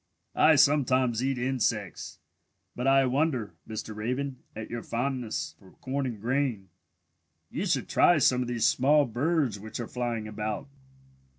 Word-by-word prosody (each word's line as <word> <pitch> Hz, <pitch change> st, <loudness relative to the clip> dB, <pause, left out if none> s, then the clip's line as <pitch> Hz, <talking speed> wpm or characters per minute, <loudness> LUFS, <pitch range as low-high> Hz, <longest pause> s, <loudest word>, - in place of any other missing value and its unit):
"I 160 Hz, -, +5 dB
sometimes 130 Hz, -4 st, +3 dB
eat 135 Hz, -1 st, 0 dB
insects, 120 Hz, -6 st, -2 dB, 0.6 s
but 125 Hz, +2 st, -2 dB
I 135 Hz, 0 st, +5 dB
wonder, 130 Hz, -4 st, 0 dB, 0.2 s
Mr. 110 Hz, 0 st, -5 dB
Raven, 125 Hz, +5 st, -3 dB, 0.2 s
at 110 Hz, 0 st, -6 dB
your 120 Hz, 0 st, -3 dB
fondness 125 Hz, -1 st, -3 dB
for 95 Hz, -2 st, -18 dB
corn 135 Hz, +1 st, -3 dB
and 115 Hz, -4 st, -5 dB
grain. 120 Hz, -4 st, -1 dB, 0.8 s
You -, -, -2 dB
should -, -, 0 dB
try 175 Hz, -, +4 dB
some 125 Hz, -3 st, +3 dB
of 125 Hz, -, -2 dB
these 120 Hz, -2 st, 0 dB
small 145 Hz, +3 st, +4 dB
birds 130 Hz, -, 0 dB
which 110 Hz, +3 st, -7 dB
are 120 Hz, -, -3 dB
flying 120 Hz, -3 st, -3 dB
about." 110 Hz, +5 st, -4 dB
125 Hz, 150 wpm, -28 LUFS, 110-135 Hz, 0.8 s, I